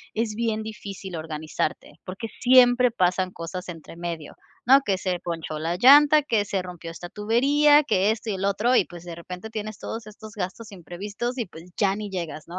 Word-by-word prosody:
es 220 -1 -1
bien 220 -1 -1
difícil 200 -4 -7
organizarte, 155 -1 -4
porque 190 +5 -6
siempre 250 0 +6
pasan 185 -4 0
cosas 180 +2 -7
entre 165 -1 -9
medio, 170 -3 -6 0.3
¿no? 265 +4 +7
Que 195 -6 0
se 185 -1 -2
ponchó 165 -3 -5
la 165 +2 -1
llanta, 290 +6 +7
que 225 -7 +1
se 195 -2 -1
rompió 175 -2 -8
esta 170 +1 -8
tubería, 285 +9 +4
que 200 -8 +2
esto 220 0 -4
y - - -1
el 190 +1 -2
otro. 210 +6 +2
Y, - - +3
pues, 175 -1 -11
de 175 -1 -7
repente, 180 +5 -8
tienes 215 -1 -5
todos 225 -1 -6
estos 215 0 -11
gastos 210 +3 -5
imprevistos 200 - -5
y, 235 - -1
pues, 165 -1 -13
ya 195 -2 +2
ni 210 -1 -5
llegas, 170 -5 -5
¿no? 175 +2 -7
200 Hz, 195 wpm, -25 LUFS, 175-230 Hz, 0.3 s, no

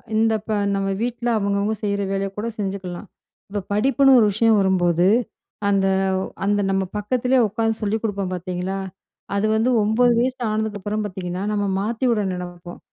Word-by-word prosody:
இந்த 225 0 +3
இப்ப 215 0 -4 0.2
நம்ம 195 0 -1
வீட்ல 240 0 -2
அவுங்கவுங்க 200 +1 0
செய்ற 200 -1 0
வேலைய 195 0 -1
கூட 215 - -2
செஞ்சுக்கலாம். 190 -1 -4 0.4
இப்ப 205 0 -3
படிப்புன்னு 270 +4 +5
ஒரு 215 - +5
விஷயம் 220 +1 +4
வரும்போது, 180 -2 +2 0.6
அந்த, 195 -1 +2 0.3
அ - - -1 0.2
அந்த 205 0 +2
நம்ம 195 0 +1
பக்கத்திலேயே 250 +4 +1
உட்காந்து 225 +2 0
சொல்லிக் 215 +1 -1
கொடுப்போம் 200 -3 -2
பார்த்தீங்களா! 180 +2 -4 0.6
அது 200 +2 +1
வந்து 225 +3 +2
9 235 +3 +3
வயசு 255 +1 0
ஆனதுக்கப்புறம் 215 -1 -2
பார்த்தீங்கன்னா, 185 -1 -4
நம்ம 205 -1 0
மாத்தி 225 +5 -2
விட 215 -3 +1
நினப்போம். 175 -1 -8
205 Hz, 155 wpm, -22 LUFS, 195-225 Hz, 0.6 s, படிப்புன்னு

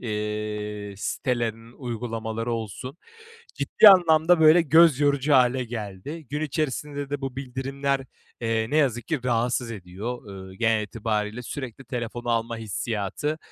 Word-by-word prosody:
eee, 105 -2 -4
sitelerinin 115 0 -2
uygulamaları 115 -2 -4
olsun 115 - -5 0.6
ciddi 215 - +6
anlamda, 175 -3 +6
böyle, 160 +2 +7
göz 160 -2 +5
yorucu 145 0 +2
hâle 125 -1 +4
geldi. 115 - -7
Gün 150 - -2
içerisinde 145 -1 -3
de 145 -1 -2
bu 135 -2 -5
bildirimler, 135 +1 -2 0.4
eee, 115 -1 0
ne 150 - +1
yazık 125 -6 +1
ki 155 -4 0
rahatsız 120 0 0
ediyor. 105 +4 -6 0.3
Eee, 95 - -13
genel 110 -1 +2
itibariyle 105 +1 -3
sürekli 130 0 -7
telefonu 120 -1 -5
alma 115 0 0
hissiyatı, 110 - -3
120 Hz, 130 wpm, -25 LUFS, 110-140 Hz, 0.6 s, böyle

